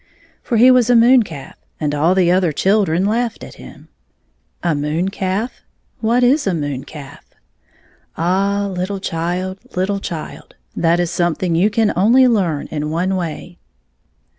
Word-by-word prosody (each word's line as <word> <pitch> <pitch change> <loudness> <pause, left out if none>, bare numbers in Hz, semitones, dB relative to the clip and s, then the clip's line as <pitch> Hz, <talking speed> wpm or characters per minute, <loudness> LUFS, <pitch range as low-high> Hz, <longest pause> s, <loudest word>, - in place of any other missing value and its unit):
For 235 - -1
he 250 +3 +7
was 250 -2 +3
a 245 - +5
moon 240 +2 +6
calf, 160 -10 -8 0.3
and 150 -2 -1
all 160 +5 +2
the 180 -2 +3
other 180 -2 +2
children 190 +1 +1
laughed 230 +2 -1
at - - -10
him - - -13 0.8
A 170 -2 +1
moon 150 +5 -1
calf? 195 +4 -3 0.4
What 235 +3 +1
is 265 +1 +3
a 185 - +1
moon 145 -4 -4
calf? 145 -3 -11 0.9
Ah, 195 +4 0
little 190 +1 -4
child, 180 +2 -3 0.2
little 195 +2 -1
child! 165 -5 -8 0.2
that 170 +1 +2
is 175 -1 -1
something 175 0 -1
you 180 +6 +3
can 215 0 +1
only 235 +8 +4
learn 180 -11 0
in 150 -1 -3
one 180 +4 -1
way. 175 0 -6
185 Hz, 155 wpm, -18 LUFS, 165-210 Hz, 0.9 s, he